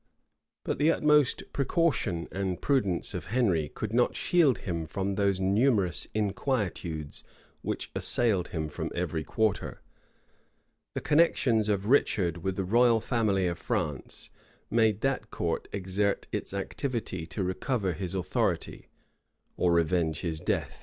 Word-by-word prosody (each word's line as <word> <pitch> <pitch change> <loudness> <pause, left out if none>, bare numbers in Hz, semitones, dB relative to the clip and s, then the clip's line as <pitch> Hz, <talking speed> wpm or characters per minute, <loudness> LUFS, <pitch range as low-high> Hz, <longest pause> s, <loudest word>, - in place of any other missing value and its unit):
But - - -2
the 150 +2 +4
utmost 150 -4 +3
precaution 135 - 0
and 95 -2 -2
prudence 105 -11 +1
of - - -4
Henry 95 - +1
could 110 0 -5
not 120 +1 +3
shield 155 - +3
him 85 -4 -4
from 95 +5 -2
those 100 -1 +1
numerous 100 -1 +2
inquietudes 95 - -2 0.4
which - - -4
assailed 105 -7 +2
him 80 -2 -3
from 75 - -4
every 85 -3 -2
quarter. 110 +6 -1 1.2
The - - -2
connections 130 -8 +3
of 100 -1 0
Richard 95 - +2
with 95 +2 -2
the 95 - -1
royal 115 +4 +4
family 110 -5 +1
of 85 -1 -2
France, 75 -6 -3 0.4
made 110 -2 +3
that 135 -5 -1
court 85 -1 -2
exert 100 +1 -1
its - - -3
activity 100 - -3
to 95 +3 -3
recover 95 +1 -1
his 95 +2 -4
authority, 95 - -1 0.7
or 90 - +2
revenge 85 -1 +1
his 80 -3 -2
death. - - -2
100 Hz, 135 wpm, -29 LUFS, 90-120 Hz, 1.2 s, the